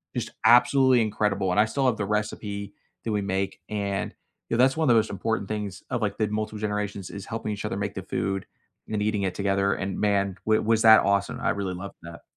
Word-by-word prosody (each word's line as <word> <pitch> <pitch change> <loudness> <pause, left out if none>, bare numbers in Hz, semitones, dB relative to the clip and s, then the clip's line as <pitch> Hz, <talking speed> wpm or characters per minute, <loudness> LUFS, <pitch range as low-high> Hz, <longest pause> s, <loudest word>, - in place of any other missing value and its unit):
Just - - -2 0.2
absolutely 130 +1 +6
incredible, 105 -3 0
and 105 - +2
I 105 - +6
still 135 +4 -1
have 125 -4 +2
the 100 - -2
recipe 105 -1 -3 0.3
that 115 - -2
we 105 - 0
make, 95 0 -2
and, 100 -2 -2 0.3
you - - 0
know, 125 - +5
that's 135 +3 +3
one 160 - +1
of 120 - +5
the - - +6
most 110 - +2
important 100 0 -2
things 105 -3 -4
of, 120 -2 -2
like, 105 -2 -1
the 110 - +1
multiple 110 0 -3
generations 105 -2 -3
is 100 -1 -8
helping 115 -1 -4
each 105 -1 -4
other - - -2
make 100 0 -3
the 95 - -6
food 95 +1 -2 0.4
and 105 -1 -2
eating 105 -1 0
it 95 - -1
together, 100 0 +1
and, 100 0 -4
man, 100 -2 +1
w 110 0 +3
was 110 0 +2
that 110 0 +8
awesome. 100 0 +1
I - - +1
really 95 -2 -2
loved 95 +2 -8
that. 85 0 -10
105 Hz, 235 wpm, -26 LUFS, 100-110 Hz, 0.4 s, that